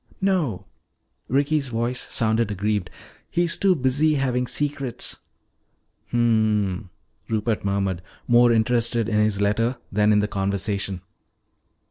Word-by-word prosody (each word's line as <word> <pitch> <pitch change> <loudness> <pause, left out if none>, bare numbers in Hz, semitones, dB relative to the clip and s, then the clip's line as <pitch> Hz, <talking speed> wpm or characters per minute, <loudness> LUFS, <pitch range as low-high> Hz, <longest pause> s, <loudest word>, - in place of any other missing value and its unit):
"No," 160 - 0 0.6
Ricky's 140 +2 +1
voice 120 +2 -2
sounded 110 0 +1
aggrieved, 105 -2 -1 0.4
"he's 175 -1 +1
too 195 -2 +3
busy 145 +3 +2
having 125 -2 0
secrets 140 0 -3 0.5
" - - -46
"Hmm," 110 -4 +1 0.4
Rupert 110 0 -1
murmured, 100 -3 -1 0.3
more 120 0 +6
interested 115 0 +1
in 105 -2 +1
his 105 -2 +1
letter 115 +5 +1
than 105 +1 +3
in 105 - +4
the 105 0 +2
conversation. 100 -1 -2
115 Hz, 115 wpm, -23 LUFS, 105-125 Hz, 0.6 s, more